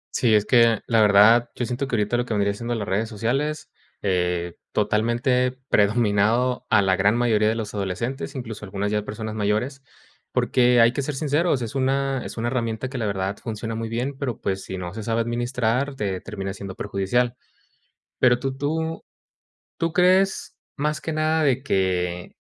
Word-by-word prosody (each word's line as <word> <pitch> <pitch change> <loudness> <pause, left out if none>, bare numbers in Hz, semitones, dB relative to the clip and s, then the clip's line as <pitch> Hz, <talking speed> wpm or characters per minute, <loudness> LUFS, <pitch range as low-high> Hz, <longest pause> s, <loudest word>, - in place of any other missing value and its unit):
Sí, 115 -4 +3
es 105 0 +3
que, 115 -2 +4
la 115 -1 +3
verdad, 105 +4 +6
yo 120 - -2
siento 130 +3 -3
que 125 - -1
ahorita 105 +3 +1
lo 120 - 0
que 110 - -1
vendría 100 0 +1
siendo 120 +3 -3
las 105 -2 -4
redes 110 +4 -1
sociales, 135 +8 -2 0.3
eh, 90 -2 0 0.2
totalmente 120 +5 +1 0.2
predominado 110 +3 +2
a 100 -2 +4
la 95 -1 +3
gran 100 +3 +3
mayoría 110 -3 +2
de 110 - 0
los 110 -2 -5
adolescentes, 115 +9 -3
incluso, 110 -5 -6
algunas 100 +1 -3
ya 105 -1 0
personas 110 0 -5
mayores. 110 +6 -1 0.5
Porque 125 -1 +3
hay 115 +1 +5
que 140 - -1
ser 140 0 -3
sinceros, 150 -2 +1
es 110 - -5
una 135 0 0
es - - -8
una 120 +1 -1
herramienta 120 0 -2
que, 130 -2 -5
la 110 - -1
verdad, 95 0 -2
funciona 115 -1 -5
muy 115 0 -4
bien, 125 +4 -2
pero, 135 -5 -4
pues, 95 0 -2
si 95 - -6
no 90 0 -6
se 110 - -6
sabe 115 +1 0
administrar, 120 +3 -1
te 95 -5 -3
termina 95 -3 -5
siendo 95 -2 -8
perjudicial. 120 +5 0 0.8
Pero, 120 -1 +4
tú 135 0 -3
tú 160 +3 -2 0.7
tú 165 -1 -1
crees, 185 +2 +2 0.2
más 150 +1 -1
que 160 - -4
nada, 155 0 +1
de 135 -1 +2
que 90 -6 -1
115 Hz, 180 wpm, -23 LUFS, 105-130 Hz, 0.8 s, verdad